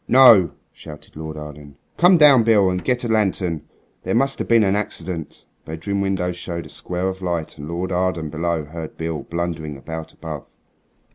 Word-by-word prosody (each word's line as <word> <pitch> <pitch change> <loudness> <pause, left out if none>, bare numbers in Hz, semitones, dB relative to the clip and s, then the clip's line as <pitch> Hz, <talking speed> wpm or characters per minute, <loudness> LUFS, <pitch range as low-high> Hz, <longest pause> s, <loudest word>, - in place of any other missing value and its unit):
"No," 115 - +7 0.2
shouted 75 -2 -12
Lord 80 0 -7
Arden. 75 -1 -10 0.2
"Come 180 +1 +6
down, 145 -6 +7
Beale, 105 -4 +4
and 90 0 -3
get 125 -1 0
a - - -1
lantern. 95 -7 0 0.3
There - - -2
must 135 0 +1
have - - -3
been 115 -2 +5
an 95 0 +2
accident." 90 -5 -4 0.2
The 80 - -8
bedroom 100 +5 -2
window 95 -2 0
showed 85 -1 -6
a - - -12
square 90 +1 -3
of 95 0 -4
light, 85 -4 -3
and 75 - -7
Lord 90 +2 -3
Arden 90 -4 -1
below 80 0 -1
heard 80 +1 -8
Beale 80 -1 -3
blundering 85 -4 -4
about 80 +3 -7
above. 75 -4 -8
85 Hz, 185 wpm, -21 LUFS, 80-100 Hz, 0.3 s, No